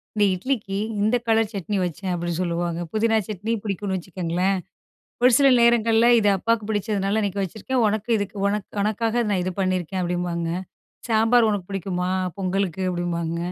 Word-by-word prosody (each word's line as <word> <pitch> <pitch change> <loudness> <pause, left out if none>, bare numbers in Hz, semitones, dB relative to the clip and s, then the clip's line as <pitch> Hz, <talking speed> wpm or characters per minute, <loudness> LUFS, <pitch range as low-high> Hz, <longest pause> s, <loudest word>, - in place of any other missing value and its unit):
இந்த 210 - +3
இட்லிக்கு 205 -2 -2 0.2
இந்த 220 +4 +3
கலர் 225 -1 +2
சட்னி 200 +1 -2
வச்சேன்." 180 +2 -4
அப்படின்னு 175 0 -3
சொல்லுவாங்க. 170 -1 -2
புதினா 225 +1 +2
சட்னி 215 +2 -3
பிடிக்கும்னு 195 -1 -2
வச்சுக்கோங்களேன். 180 +1 -1 0.7
ஒரு 250 - +7
சில 275 - +6
நேரங்கள்ல 230 0 +4
"இது 205 -1 +3
அப்பாவுக்கு 225 +1 0
பிடிச்சதுனால 205 0 0
இன்னைக்கு 200 -1 -1
வச்சிருக்கேன். 225 +6 -2
உனக்கு 215 +2 -2
இதுக்கு 200 0 -4
உனக்கு 205 0 -2
உனக்காக 225 +3 0
நான் 190 -3 +1
இது 185 0 -3
பண்ணியிருக்கேன்." 185 -1 -1
அப்படிம்பாங்க. 175 -1 -2 0.6
"சாம்பார் 225 +1 +4
உனக்கு 200 -3 -3
பிடிக்குமா? 180 -1 -2 0.3
பொங்கலுக்கு." 190 -1 -1
அப்படிம்பாங்க. 170 -1 -2
195 Hz, 145 wpm, -23 LUFS, 180-220 Hz, 0.7 s, ஒரு